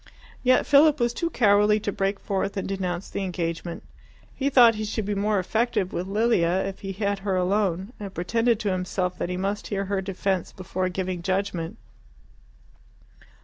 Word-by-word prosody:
Yet 255 Hz, 0 st, +4 dB
Philip 295 Hz, +1 st, +5 dB
was 240 Hz, 0 st, +1 dB
too 335 Hz, +6 st, -1 dB
cowardly 210 Hz, -4 st, +4 dB
to 205 Hz, -, -2 dB
break 195 Hz, +1 st, -1 dB
forth 200 Hz, +1 st, -2 dB
and 195 Hz, -, -2 dB
denounce 185 Hz, -2 st, -3 dB
the 200 Hz, -, -4 dB
engagement. 170 Hz, -2 st, -4 dB, 0.5 s
He 275 Hz, +1 st, 0 dB
thought 245 Hz, -4 st, +7 dB
he 215 Hz, 0 st, -4 dB
should 215 Hz, 0 st, -3 dB
be 205 Hz, -, -1 dB
more 205 Hz, +1 st, +1 dB
effective 195 Hz, 0 st, 0 dB
with 180 Hz, +2 st, -3 dB
Lilia 195 Hz, -4 st, +2 dB
if 195 Hz, 0 st, -5 dB
he 195 Hz, -, -5 dB
had 200 Hz, 0 st, -1 dB
her 195 Hz, -1 st, -1 dB
alone, 190 Hz, +2 st, 0 dB
and 200 Hz, -2 st, -6 dB
pretended 225 Hz, +6 st, +1 dB
to 205 Hz, -, 0 dB
himself 180 Hz, 0 st, -2 dB
that -, -, -2 dB
he 180 Hz, -, -2 dB
must 200 Hz, +2 st, -2 dB
hear 200 Hz, -1 st, -2 dB
her 195 Hz, 0 st, -1 dB
defence 190 Hz, -1 st, -2 dB
before 185 Hz, 0 st, -3 dB
giving 185 Hz, -1 st, -3 dB
judgment. 185 Hz, -2 st, -2 dB
195 Hz, 175 wpm, -25 LUFS, 185-215 Hz, 0.5 s, thought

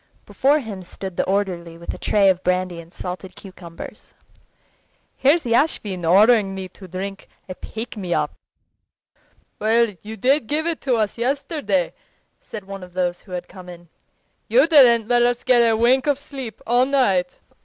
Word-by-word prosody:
Before 285 Hz, +3 st, +2 dB
him 220 Hz, -9 st, -6 dB
stood 185 Hz, +1 st, -8 dB
the -, -, 0 dB
orderly 180 Hz, -4 st, -2 dB
with 170 Hz, -, -6 dB
a -, -, -10 dB
tray 200 Hz, -2 st, +3 dB
of 185 Hz, -1 st, +2 dB
brandy 180 Hz, -1 st, -1 dB
and 165 Hz, 0 st, -17 dB
salted 185 Hz, +1 st, -7 dB
cucumbers. 180 Hz, -4 st, -11 dB, 1.0 s
"Here's 300 Hz, +5 st, +3 dB
Yashvin 230 Hz, -, 0 dB
ordering 200 Hz, +2 st, +4 dB
me 190 Hz, -1 st, -6 dB
to 190 Hz, +1 st, -13 dB
drink 195 Hz, +2 st, -6 dB, 0.2 s
a 185 Hz, -, -5 dB
pick 225 Hz, +6 st, -7 dB
me 185 Hz, -5 st, -5 dB
up." -, -, 0 dB, 1.3 s
"Well, 225 Hz, +1 st, +3 dB
you 220 Hz, +1 st, -8 dB
did 260 Hz, +3 st, +2 dB
give 305 Hz, +4 st, 0 dB
it 335 Hz, -2 st, -1 dB
to 260 Hz, -3 st, +1 dB
us 215 Hz, 0 st, -1 dB
yesterday," 250 Hz, -, -1 dB, 0.5 s
said 215 Hz, -3 st, -9 dB
one 195 Hz, 0 st, -8 dB
of 180 Hz, -1 st, -12 dB
those 175 Hz, -1 st, -1 dB
who 185 Hz, -, -13 dB
had 180 Hz, 0 st, -5 dB
come 185 Hz, -2 st, -12 dB
in; 175 Hz, -1 st, -12 dB, 0.6 s
"you -, -, +5 dB
didn't 245 Hz, -9 st, +6 dB
let 240 Hz, 0 st, +3 dB
us 240 Hz, 0 st, +1 dB
get 250 Hz, -2 st, +4 dB
a 225 Hz, -1 st, +3 dB
wink 250 Hz, +4 st, +3 dB
of 290 Hz, -2 st, +2 dB
sleep 265 Hz, -6 st, -8 dB
all 245 Hz, +2 st, +3 dB
night." 200 Hz, -11 st, +1 dB
210 Hz, 170 wpm, -21 LUFS, 185-245 Hz, 1.3 s, didn't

